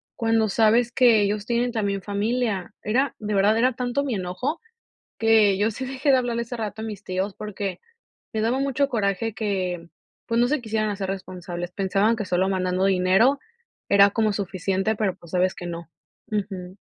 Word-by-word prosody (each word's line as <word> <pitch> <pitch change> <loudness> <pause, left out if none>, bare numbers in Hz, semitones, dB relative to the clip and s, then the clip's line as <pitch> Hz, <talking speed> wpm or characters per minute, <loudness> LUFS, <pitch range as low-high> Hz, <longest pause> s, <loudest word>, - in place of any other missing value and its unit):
cuando 225 -1 +2
sabes 225 +3 +3
que 235 -4 +5
ellos 205 +1 0
tienen 240 +1 +1
también 200 -3 -1
familia". 210 0 -1
Era, 260 +6 +1
de 210 -1 -3
verdad, 205 +3 +3
era 255 +2 +3
tanto 250 +3 -1
mi 275 -3 -2
enojo 195 - -3 0.6
que 220 -3 +4
yo 210 +2 +2
sí 260 +4 -5
dejé 270 +2 0
de 265 - +6
hablarle 240 -2 -1
hace 235 +1 -6
rato 220 -1 -4
a - - -4
mis 210 -3 -6
tíos, 190 +1 -3
porque 200 -3 -5 0.5
me 220 - -1
daba 230 +4 +1
mucho 275 0 +1
coraje 215 -1 -1
que, 185 -5 -2 0.4
pues, 230 0 0
no 245 - +4
se 295 -1 0
quisieran 220 -1 -1
hacer 195 -2 -3
responsables. 180 -2 -5
Pensaban 195 +4 +1
que 215 -2 -4
solo 185 +1 +1
mandando 185 0 0
dinero 195 +8 +4 0.5
era 200 0 +7
como 220 -1 +1
suficiente, 195 +1 -1
pero, 205 -3 -1
pues 170 - -16
sabes 185 0 +2
que 175 - -7
no. 170 -1 -7 0.4
Ujú. 190 -3 -4
210 Hz, 180 wpm, -24 LUFS, 190-230 Hz, 0.6 s, era